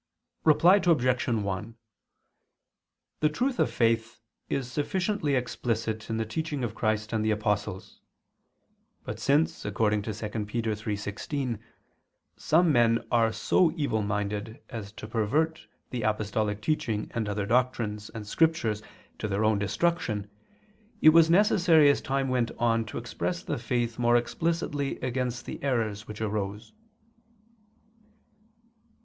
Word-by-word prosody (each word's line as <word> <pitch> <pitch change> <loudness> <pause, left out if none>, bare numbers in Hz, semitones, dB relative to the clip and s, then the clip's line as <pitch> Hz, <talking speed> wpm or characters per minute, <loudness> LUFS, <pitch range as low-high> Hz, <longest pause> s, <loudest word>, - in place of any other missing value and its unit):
Reply 175 +5 +6
Obj. 130 -7 +2
1: 105 -1 -2 1.4
The 150 - +3
truth 250 - -1
of - - +3
faith 115 0 +1 0.3
is 125 -2 -2
sufficiently 175 +1 0
explicit 115 -3 -2
in 110 - -1
the 110 - -1
teaching 145 +4 -3
of 115 -3 -2
Christ 110 0 -1
and 110 -1 +1
the 110 - +1
apostles. 105 -3 -2 1.0
But 105 +1 -6
since, 145 +7 +1
according 105 0 +1
to 110 - -4
2 - - -10
Pet. - - -18 0.3
3:16, 110 +4 -3 0.8
some 165 +1 +3
men 115 -3 +3
are 115 -2 +3
so 160 +10 +2
evil 140 -9 0
minded 105 +2 -3
as 110 -5 -6
to 110 - -8
pervert 135 +9 0 0.2
the 125 -2 -3
apostolic 105 -1 -1
teaching 110 -8 -1
and 110 -3 -2
other 105 0 -2
doctrines 115 -3 0
and 110 -2 -7
Scriptures 115 -5 +1 0.4
to - - -2
their 105 +1 0
own 110 -1 +3
destruction, 105 -3 -1 0.7
it 155 - +10
was 165 0 +6
necessary 170 -5 +5
as - - -1
time 135 0 -1
went 125 -2 +1
on 115 -1 +2
to 110 - -7
express - - -3
the - - -3
faith 120 -1 -1
more 120 0 +4
explicitly 145 +3 -1
against 125 -1 -2
the - - -7
errors 115 -5 -1
which 105 0 -8
arose. 105 - -3
115 Hz, 130 wpm, -28 LUFS, 105-140 Hz, 1.4 s, it